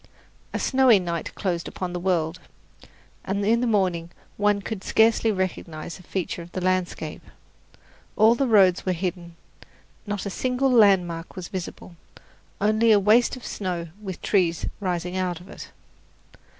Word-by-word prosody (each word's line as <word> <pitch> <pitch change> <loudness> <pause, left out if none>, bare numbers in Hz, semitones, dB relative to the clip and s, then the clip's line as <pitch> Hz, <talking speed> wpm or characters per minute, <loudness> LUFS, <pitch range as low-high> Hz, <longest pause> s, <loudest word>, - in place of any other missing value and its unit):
A - - -2
snowy 260 -4 +4
night 170 -3 -4
closed 175 -4 -2
upon 180 -1 -5
the 180 - -3
world, 175 -2 0 0.8
and 200 +1 -2
in 230 +3 +3
the 250 - +1
morning 185 -6 0 0.3
one 205 0 +2
could 200 0 -6
scarcely 225 0 +3
recognize 175 -4 -4
a - - -13
feature 180 -1 -4
of 170 +1 -11
the - - -2
landscape. 185 -1 -2 0.9
All 220 +2 +6
the 265 +3 0
roads 195 -5 +4
were 185 - 0
hidden, 175 -1 -4 0.7
not 205 -1 -3
a 200 - -3
single 255 +4 0
landmark 185 -7 +3
was 185 -2 -7
visible, 180 -1 -7 0.6
only 215 +2 +3
a 210 - +6
waste 220 +6 +4
of 255 - -11
snow 175 -4 -4
with 190 -4 -7
trees 175 -5 +1
rising 180 -2 -2
out 180 -2 -2
of 180 - -15
it. - - -10
190 Hz, 150 wpm, -24 LUFS, 175-215 Hz, 0.9 s, All